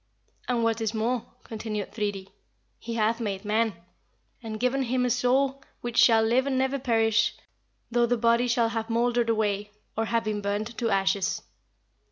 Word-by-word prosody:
"And 240 Hz, -2 st, +1 dB
what 225 Hz, 0 st, +1 dB
is 220 Hz, 0 st, -1 dB
more," 230 Hz, +2 st, -1 dB, 0.2 s
continued 215 Hz, -2 st, -5 dB
Thridi, 205 Hz, -3 st, -3 dB, 0.5 s
"he 230 Hz, -, -5 dB
hath 225 Hz, +1 st, +1 dB
made 205 Hz, -3 st, -3 dB
man, 215 Hz, 0 st, +1 dB, 0.7 s
and 220 Hz, -2 st, -6 dB
given 250 Hz, +3 st, +1 dB
him 250 Hz, 0 st, 0 dB
a 245 Hz, -, +1 dB
soul 265 Hz, +3 st, +1 dB, 0.2 s
which 240 Hz, -1 st, -4 dB
shall 225 Hz, -2 st, +6 dB
live 245 Hz, +4 st, +2 dB
and 265 Hz, -2 st, 0 dB
never 265 Hz, +1 st, +1 dB
perish 225 Hz, -3 st, +2 dB, 0.6 s
though 240 Hz, 0 st, +3 dB
the 245 Hz, +1 st, +1 dB
body 235 Hz, +1 st, +3 dB
shall 235 Hz, -1 st, +2 dB
have 225 Hz, 0 st, -3 dB
mouldered 235 Hz, 0 st, +1 dB
away, 210 Hz, -2 st, 0 dB, 0.3 s
or 225 Hz, -, 0 dB
have 230 Hz, 0 st, 0 dB
been 215 Hz, -1 st, -2 dB
burnt 205 Hz, +3 st, -2 dB
to 235 Hz, -2 st, 0 dB
ashes. 195 Hz, -1 st, +1 dB
230 Hz, 170 wpm, -27 LUFS, 215-245 Hz, 0.7 s, shall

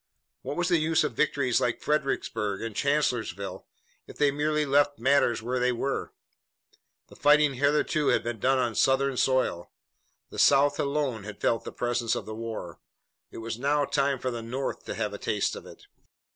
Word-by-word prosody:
What 145 Hz, -, -5 dB
was 175 Hz, 0 st, 0 dB
the 175 Hz, -2 st, +3 dB
use 160 Hz, +1 st, +2 dB
of -, -, -2 dB
victories 140 Hz, -5 st, +1 dB
like 120 Hz, -, 0 dB
Fredericksburg 115 Hz, -9 st, -1 dB
and 115 Hz, -2 st, -5 dB
Chancellorsville, 115 Hz, -, -1 dB, 0.4 s
if -, -, -12 dB
they 145 Hz, -1 st, +3 dB
merely 150 Hz, +1 st, 0 dB
left 145 Hz, +1 st, +2 dB
matters 120 Hz, -2 st, +2 dB
where 125 Hz, +2 st, -1 dB
they 125 Hz, 0 st, +2 dB
were? 135 Hz, +3 st, -3 dB, 1.0 s
The -, -, -15 dB
fighting 150 Hz, -1 st, +4 dB
hitherto 145 Hz, +3 st, +1 dB
had -, -, +3 dB
been 120 Hz, -2 st, -4 dB
done 135 Hz, +5 st, +2 dB
on 120 Hz, -3 st, 0 dB
Southern 135 Hz, +4 st, +2 dB
soil. 130 Hz, -10 st, 0 dB, 0.6 s
The -, -, -6 dB
South 145 Hz, +1 st, +4 dB
alone 140 Hz, -6 st, -1 dB
had 105 Hz, +1 st, -9 dB
felt 115 Hz, -, 0 dB
the -, -, -6 dB
presence 120 Hz, -1 st, -1 dB
of -, -, -4 dB
war. 110 Hz, -6 st, -6 dB, 0.5 s
It -, -, -11 dB
was 115 Hz, 0 st, -4 dB
now 145 Hz, +2 st, +1 dB
time 140 Hz, 0 st, +1 dB
for 130 Hz, 0 st, -3 dB
the 120 Hz, -1 st, -5 dB
North 125 Hz, +4 st, -4 dB
to -, -, -5 dB
have 105 Hz, -2 st, -2 dB
a 100 Hz, -, -6 dB
taste 105 Hz, -2 st, -1 dB
of -, -, -10 dB
it. -, -, -14 dB
130 Hz, 180 wpm, -27 LUFS, 115-145 Hz, 1.0 s, fighting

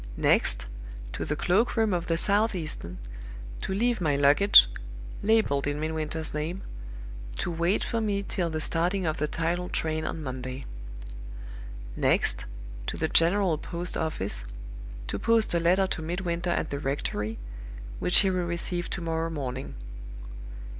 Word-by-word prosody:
Next, -, -, +3 dB, 0.5 s
to -, -, -3 dB
the 150 Hz, -, -1 dB
cloak 200 Hz, +10 st, +1 dB
room 220 Hz, -3 st, +2 dB
of 175 Hz, -1 st, -2 dB
the 165 Hz, -, +1 dB
Southeastern, 180 Hz, -, +1 dB, 0.6 s
to -, -, -4 dB
leave 230 Hz, +2 st, +1 dB
my 150 Hz, -4 st, +2 dB
luggage 145 Hz, -, +7 dB, 0.5 s
(labeled 200 Hz, -11 st, +2 dB
in 145 Hz, 0 st, -2 dB
Midwinter's 155 Hz, 0 st, -3 dB
name), 160 Hz, +5 st, -3 dB, 0.7 s
to -, -, -2 dB
wait 170 Hz, +4 st, +1 dB
for 230 Hz, -, -1 dB
me 200 Hz, -2 st, -1 dB
till 180 Hz, -3 st, -2 dB
the 160 Hz, -1 st, -3 dB
starting 175 Hz, +4 st, 0 dB
of 155 Hz, -1 st, -1 dB
the 150 Hz, -, 0 dB
tidal 170 Hz, +3 st, -2 dB
train 155 Hz, 0 st, -1 dB
on 155 Hz, 0 st, -4 dB
Monday. 130 Hz, 0 st, -5 dB, 1.3 s
Next, -, -, +2 dB, 0.4 s
to -, -, -3 dB
the 160 Hz, -, -1 dB
General 170 Hz, -1 st, +3 dB
Post 175 Hz, +2 st, -4 dB
office, 100 Hz, -, -2 dB, 0.6 s
to -, -, -4 dB
post 230 Hz, -3 st, +3 dB
a 170 Hz, -, +3 dB
letter 180 Hz, +3 st, +3 dB
to 180 Hz, -, -3 dB
Midwinter 175 Hz, +1 st, -2 dB
at 170 Hz, -, -1 dB
the 140 Hz, -, -2 dB
rectory, 115 Hz, -6 st, -3 dB, 0.6 s
which 180 Hz, -, +6 dB
he 195 Hz, -2 st, +2 dB
will 180 Hz, -1 st, -1 dB
receive 175 Hz, 0 st, -3 dB
to -, -, -4 dB
morrow 165 Hz, 0 st, -1 dB
morning. 135 Hz, -4 st, -5 dB
165 Hz, 145 wpm, -27 LUFS, 150-185 Hz, 1.3 s, luggage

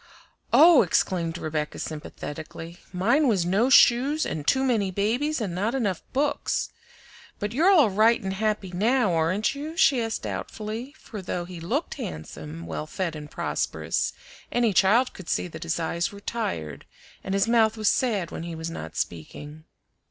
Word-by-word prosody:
"Oh!" 305 Hz, +4 st, +8 dB
exclaimed 170 Hz, -2 st, 0 dB
Rebecca 155 Hz, -2 st, -3 dB
sympathetically, 160 Hz, +2 st, -7 dB
"mine 235 Hz, +12 st, +2 dB
was 195 Hz, -8 st, +2 dB
no 200 Hz, +8 st, +2 dB
shoes 270 Hz, +5 st, +5 dB
and 150 Hz, -2 st, -4 dB
too 265 Hz, -, +3 dB
many 225 Hz, -7 st, +1 dB
babies 240 Hz, +11 st, 0 dB
and 200 Hz, -6 st, -3 dB
not 210 Hz, +8 st, -1 dB
enough 205 Hz, -9 st, -1 dB
books. 285 Hz, +2 st, 0 dB, 0.7 s
But 205 Hz, 0 st, -3 dB
you're 325 Hz, +9 st, +4 dB
all 305 Hz, -, +6 dB
right 220 Hz, +4 st, +4 dB
and 190 Hz, -1 st, -3 dB
happy 210 Hz, -2 st, -1 dB
now, 215 Hz, +2 st, +2 dB
aren't 170 Hz, +8 st, +1 dB
you?" 305 Hz, +4 st, -7 dB
she 275 Hz, -9 st, +4 dB
asked 225 Hz, -1 st, -3 dB
doubtfully, 225 Hz, +6 st, -5 dB
for 215 Hz, -9 st, -8 dB
though 175 Hz, -1 st, -3 dB
he 175 Hz, -1 st, -9 dB
looked 240 Hz, -, -2 dB
handsome, 80 Hz, +1 st, -7 dB
well 75 Hz, -2 st, -5 dB
fed, 175 Hz, -4 st, -3 dB
and 150 Hz, -1 st, -8 dB
prosperous, -, -, -2 dB, 0.4 s
any 235 Hz, -3 st, +2 dB
child 220 Hz, +8 st, +4 dB
could 185 Hz, -, -10 dB
see -, -, 0 dB
that -, -, -9 dB
his 170 Hz, 0 st, -2 dB
eyes 170 Hz, +1 st, -1 dB
were 200 Hz, -, -10 dB
tired 85 Hz, -, -4 dB, 0.4 s
and 190 Hz, -, -2 dB
his 195 Hz, +1 st, +2 dB
mouth 225 Hz, -1 st, +3 dB
was 215 Hz, -1 st, -1 dB
sad 205 Hz, -10 st, +1 dB
when -, -, -5 dB
he 170 Hz, 0 st, -6 dB
was 160 Hz, +1 st, -5 dB
not 80 Hz, -, -7 dB
speaking. 145 Hz, -, -6 dB
200 Hz, 165 wpm, -25 LUFS, 165-240 Hz, 0.7 s, Oh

